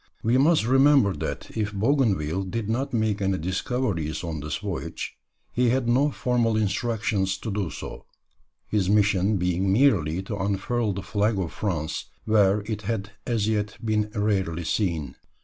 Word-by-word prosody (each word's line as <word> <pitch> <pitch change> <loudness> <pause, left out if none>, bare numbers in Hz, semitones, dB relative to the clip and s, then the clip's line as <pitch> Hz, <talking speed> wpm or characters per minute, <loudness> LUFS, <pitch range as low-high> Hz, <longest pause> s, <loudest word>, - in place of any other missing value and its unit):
We 120 +3 +3
must 150 -3 +4
remember 135 -4 +5
that - - -5
if 105 -1 -1
Bougainville 100 - +1
did 100 +3 -3
not 130 +5 -1
make 110 -3 0
any 95 -1 +1
discoveries 90 - -2
on 80 -3 -4
this 75 +1 -3
voyage, - - -5 0.4
he 125 0 +2
had 125 0 +1
no 130 +5 +3
formal 120 -5 +1
instructions 105 -3 0
to 110 +3 -5
do 100 -4 -1
so, 80 +1 -8 0.6
his 100 -3 0
mission 100 -1 +3
being 90 +1 +1
merely 95 - +3
to 105 +2 -4
unfurl 100 +3 -1
the 95 0 -5
flag 105 +1 0
of 90 -4 -2
France 85 -7 -2 0.2
where 105 -2 +4
it 105 0 -4
had 105 -1 -3 0.2
as 115 -4 +1
yet 105 -2 -1
been 105 -1 +1
rarely 95 -5 0
seen. 85 -5 -1
105 Hz, 155 wpm, -25 LUFS, 95-115 Hz, 0.6 s, remember